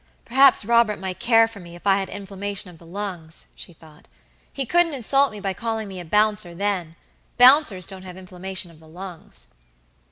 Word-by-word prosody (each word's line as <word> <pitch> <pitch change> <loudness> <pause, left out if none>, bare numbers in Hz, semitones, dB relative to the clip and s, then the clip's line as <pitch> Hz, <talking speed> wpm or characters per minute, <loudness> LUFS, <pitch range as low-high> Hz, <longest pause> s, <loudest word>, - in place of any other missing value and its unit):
"Perhaps 265 -2 +5
Robert 235 -2 +3
might 185 -1 -5
care 225 -1 +4
for 225 -3 -11
me, 170 -1 -12
if 175 - -15
I 195 0 +4
had 195 - -3
inflammation 200 -1 -3
of 165 - -17
the 170 - -16
lungs," 175 -4 -5
she - - -11
thought. 155 -2 -18 0.4
"He 270 - -3
couldn't 335 +3 +2
insult 275 +3 +2
me 210 - -9
by 195 -1 -2
calling 225 +1 -3
me 190 -2 -8
a 175 - -8
bouncer 210 -1 +1
then. 185 -4 -2 0.4
Bouncers 250 - +5
don't 190 -1 -6
have 185 -1 -10
inflammation 185 -1 -4
of 160 - -18
the 160 - -17
lungs." 170 - -10
195 Hz, 190 wpm, -23 LUFS, 175-225 Hz, 0.4 s, Perhaps